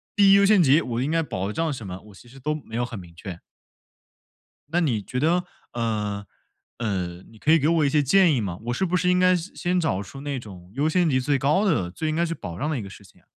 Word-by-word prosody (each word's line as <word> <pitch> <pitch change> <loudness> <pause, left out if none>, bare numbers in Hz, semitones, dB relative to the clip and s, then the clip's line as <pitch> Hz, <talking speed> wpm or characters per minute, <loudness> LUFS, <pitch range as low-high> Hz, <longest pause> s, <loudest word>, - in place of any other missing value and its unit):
第 200 -1 +6
一 - - +8
优 200 0 +6
先 205 -2 +5
级， 145 +2 +5
我 120 0 -3
应 140 +4 -1
该 165 0 +2
保 100 -7 -3
障 165 +3 0
什 125 -6 -6
么， 90 0 -6
我 105 - -15
其 120 - -16
实 135 +3 -14
都 150 +4 -1
没 135 -7 -9
有 120 - 0
很 120 -4 -7
明 85 -2 -13
确。 85 -1 -8 1.3
那 170 +3 +1
你 125 -11 0
觉 125 - -5
得， 170 +4 +2 0.3
呃， 105 -3 -2 0.5
呃， 90 -6 -3
你 110 - -17
可 155 - 0
以 165 - +6
给 150 +1 +1
我 165 -2 +3
一 - - +3
些 150 +1 +3
建 170 +3 +4
议 125 - +1
吗？ 95 -5 -4
我 120 - 0
是 190 - 0
不 180 0 0
是 180 0 +1
应 180 - +3
该 185 0 +5
先 175 +3 -7
先 180 0 0
找 100 - 0
出 135 +8 -10
那 140 -1 -3
种 95 -6 -11
优 145 +4 +1
先 175 +1 +2
级 130 -4 +2
最 140 +2 +1
高 150 +9 +2
的， 145 - +1
最 155 - -3
应 155 - -1
该 170 - +2
去 165 - -3
保 85 - -7
障 150 - -1
的 155 - -1
一 - - -4
个 100 - -8
事 - - -13
情 - - -21
啊。 - - -32
140 Hz, 300 characters per minute, -24 LUFS, 105-165 Hz, 1.3 s, 一